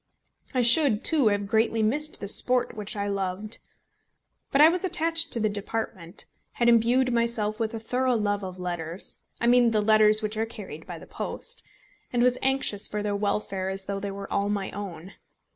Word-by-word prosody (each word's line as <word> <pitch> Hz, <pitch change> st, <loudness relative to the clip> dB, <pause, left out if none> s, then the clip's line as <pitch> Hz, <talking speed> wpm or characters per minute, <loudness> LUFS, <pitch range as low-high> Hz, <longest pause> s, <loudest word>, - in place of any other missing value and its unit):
I 255 Hz, -2 st, +1 dB
should, 235 Hz, -2 st, +4 dB
too, 300 Hz, -8 st, +4 dB
have 205 Hz, -1 st, +1 dB
greatly 220 Hz, +2 st, +1 dB
missed 300 Hz, +8 st, 0 dB
the 200 Hz, -, -5 dB
sport 250 Hz, +4 st, +4 dB
which 210 Hz, -1 st, -5 dB
I 200 Hz, -1 st, -2 dB
loved. 200 Hz, +2 st, -3 dB, 0.9 s
But 275 Hz, -, +2 dB
I 300 Hz, -, +9 dB
was 355 Hz, +3 st, +1 dB
attached 330 Hz, -2 st, +1 dB
to 235 Hz, -, -1 dB
the 215 Hz, -, +2 dB
department, 205 Hz, -3 st, -5 dB, 0.3 s
had 235 Hz, -, 0 dB
imbued 240 Hz, +2 st, +3 dB
myself 230 Hz, -2 st, 0 dB
with 225 Hz, 0 st, -2 dB
a -, -, -4 dB
thorough 250 Hz, +3 st, 0 dB
love 205 Hz, -2 st, -1 dB
of 185 Hz, -1 st, -6 dB
letters, 175 Hz, -1 st, -4 dB, 0.2 s
I -, -, -1 dB
mean 240 Hz, 0 st, +5 dB
the 220 Hz, -2 st, +1 dB
letters 215 Hz, 0 st, +4 dB
which 215 Hz, +1 st, -2 dB
are 225 Hz, +1 st, -1 dB
carried 190 Hz, -9 st, -9 dB
by -, -, -7 dB
the -, -, -12 dB
post, 480 Hz, +1 st, -5 dB, 0.5 s
and 240 Hz, -1 st, +1 dB
was 250 Hz, 0 st, +2 dB
anxious 265 Hz, -6 st, +1 dB
for 210 Hz, 0 st, -4 dB
their 205 Hz, -1 st, -1 dB
welfare 200 Hz, -2 st, -2 dB
as 190 Hz, 0 st, -4 dB
though 195 Hz, 0 st, -3 dB
they 200 Hz, 0 st, -4 dB
were 195 Hz, 0 st, -7 dB
all 200 Hz, 0 st, 0 dB
my 200 Hz, -2 st, -2 dB
own. 190 Hz, -3 st, -8 dB
215 Hz, 195 wpm, -26 LUFS, 200-245 Hz, 0.9 s, I